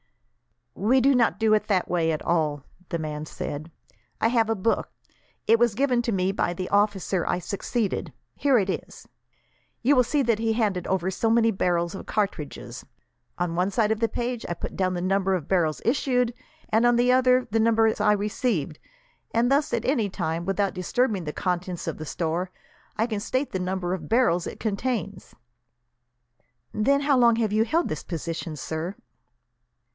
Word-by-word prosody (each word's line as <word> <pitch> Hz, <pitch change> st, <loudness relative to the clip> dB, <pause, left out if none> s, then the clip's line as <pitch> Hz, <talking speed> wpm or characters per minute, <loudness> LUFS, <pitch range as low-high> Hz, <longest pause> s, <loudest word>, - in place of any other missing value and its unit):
"We 225 Hz, -, +2 dB
do 275 Hz, +2 st, +4 dB
not 240 Hz, -3 st, +2 dB
do 220 Hz, -1 st, +3 dB
it 215 Hz, -, +2 dB
that 190 Hz, -4 st, +1 dB
way 165 Hz, -2 st, +1 dB
at 155 Hz, -, -3 dB
all," 150 Hz, -4 st, 0 dB, 0.3 s
the 170 Hz, -, -1 dB
man 155 Hz, -1 st, -5 dB
said. 150 Hz, +2 st, -6 dB, 0.5 s
"I 225 Hz, -, +3 dB
have 230 Hz, -2 st, +2 dB
a 225 Hz, -, +2 dB
book. 215 Hz, +3 st, 0 dB, 0.6 s
It 225 Hz, +1 st, +4 dB
was 235 Hz, -3 st, +3 dB
given 255 Hz, -1 st, +2 dB
to 235 Hz, -, -1 dB
me 190 Hz, -1 st, +1 dB
by 175 Hz, -3 st, -1 dB
the 185 Hz, +1 st, -4 dB
officer 200 Hz, -3 st, +1 dB
I -, -, +1 dB
succeeded. 200 Hz, +4 st, -2 dB, 0.2 s
Here 275 Hz, -3 st, +3 dB
it 195 Hz, -4 st, +1 dB
is. 190 Hz, -, -5 dB, 0.8 s
You 280 Hz, +4 st, +5 dB
will 250 Hz, -, +5 dB
see 285 Hz, +3 st, +1 dB
that 230 Hz, -3 st, +1 dB
he 225 Hz, 0 st, +1 dB
handed 205 Hz, -6 st, 0 dB
over 190 Hz, 0 st, 0 dB
so 225 Hz, +4 st, 0 dB
many 230 Hz, 0 st, +4 dB
barrels 175 Hz, -3 st, 0 dB
of 195 Hz, -, -8 dB
cartridges. 195 Hz, -9 st, -3 dB, 0.5 s
On 175 Hz, -1 st, -1 dB
one 180 Hz, +3 st, +1 dB
side 210 Hz, +2 st, +1 dB
of 220 Hz, -, 0 dB
the 230 Hz, -, +2 dB
page 240 Hz, -1 st, -3 dB
I 175 Hz, -, -2 dB
put -, -, -6 dB
down 185 Hz, -1 st, 0 dB
the 175 Hz, -, -2 dB
number 195 Hz, 0 st, +1 dB
of 165 Hz, -5 st, -4 dB
barrels 165 Hz, -5 st, +1 dB
issued, 250 Hz, -1 st, +1 dB, 0.4 s
and 220 Hz, +2 st, +3 dB
on 240 Hz, 0 st, +5 dB
the 245 Hz, +1 st, +3 dB
other 255 Hz, 0 st, +4 dB
the 225 Hz, -, +2 dB
number 225 Hz, 0 st, +4 dB
I 210 Hz, -, +4 dB
receive, 210 Hz, -, -1 dB, 0.6 s
and 240 Hz, +3 st, +3 dB
thus, 285 Hz, +2 st, +2 dB
at 235 Hz, -1 st, -1 dB
any 235 Hz, -7 st, +1 dB
time, 170 Hz, -3 st, -3 dB
without 195 Hz, +1 st, 0 dB
disturbing 190 Hz, +1 st, 0 dB
the 150 Hz, -, -4 dB
contents 180 Hz, -1 st, -2 dB
of -, -, -3 dB
the 155 Hz, -, -5 dB
store, 170 Hz, +4 st, -2 dB, 0.5 s
I 220 Hz, -, +2 dB
can 220 Hz, -3 st, -3 dB
state 260 Hz, +6 st, -2 dB
the 190 Hz, -, -2 dB
number 180 Hz, -1 st, -2 dB
of 185 Hz, -, -5 dB
barrels 210 Hz, -7 st, +2 dB
it -, -, -8 dB
contains." 205 Hz, -2 st, -3 dB, 1.4 s
"Then 280 Hz, +7 st, +2 dB
how 280 Hz, -2 st, +3 dB
long 235 Hz, -1 st, +5 dB
have 220 Hz, -2 st, 0 dB
you 220 Hz, +1 st, +3 dB
held 330 Hz, +9 st, +1 dB
this 155 Hz, -, -4 dB
position, 165 Hz, -1 st, -5 dB
sir?" 160 Hz, +6 st, -4 dB
205 Hz, 185 wpm, -25 LUFS, 180-235 Hz, 1.4 s, You